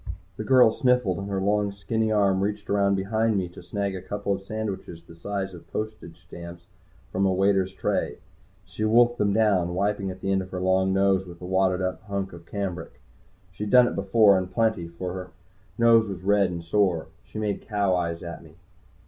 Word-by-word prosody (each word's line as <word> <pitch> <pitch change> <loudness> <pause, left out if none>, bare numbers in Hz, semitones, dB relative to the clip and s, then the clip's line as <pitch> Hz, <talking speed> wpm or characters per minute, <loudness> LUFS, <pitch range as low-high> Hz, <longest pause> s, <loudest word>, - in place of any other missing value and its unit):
The 110 - -5
girl 125 -1 +6
sniffled, 125 -7 +1
and 100 +1 -5
her 95 -1 -1
long 100 +1 +1
skinny 110 +2 -1
arm 100 -3 +2
reached 105 +1 -3
around 100 -1 +3
behind 110 +3 0
me 95 -2 -1
to 90 - -12
snag 100 +2 -3
a 95 - -6
couple 100 +1 -3
sandwiches 100 -5 -6
the 85 0 -15
size 95 +2 -4
of 85 - -13
postage 105 -6 -6
stamps 85 -1 -10 0.5
from 95 - 0
a - - +2
waiter's 95 0 +2
tray. - - -1 0.5
She 95 +4 -6
wolfed 120 +2 +4
them 100 -1 +2
down, 100 -5 +2
wiping 100 0 -1
at 95 0 -8
the 95 - -1
end 95 0 +2
of 95 - -8
her 90 - -5
long 95 +1 +2
nose 95 -1 +2
with 85 -1 -11
a 90 - -8
wadded 95 0 +1
up 95 0 -2
hunk 100 -2 -4
of 85 -1 -12
cambric. 100 -3 -5 0.5
She'd 105 +3 -5
done 125 +1 +7
it - - -3
before, 100 0 +4
and 95 0 -5
plenty, 110 -5 0
for 90 +2 -6
her 90 -1 -7 0.5
nose 115 -1 +5
was 95 -2 -6
red 100 -1 +3
and 85 -1 -5
sore. 85 -2 +1
She - - -11
made 105 -2 -2
cow 100 -3 0
eyes 85 -1 -2
at 85 -1 -7
me. 80 -1 -17
95 Hz, 200 wpm, -25 LUFS, 90-105 Hz, 0.5 s, done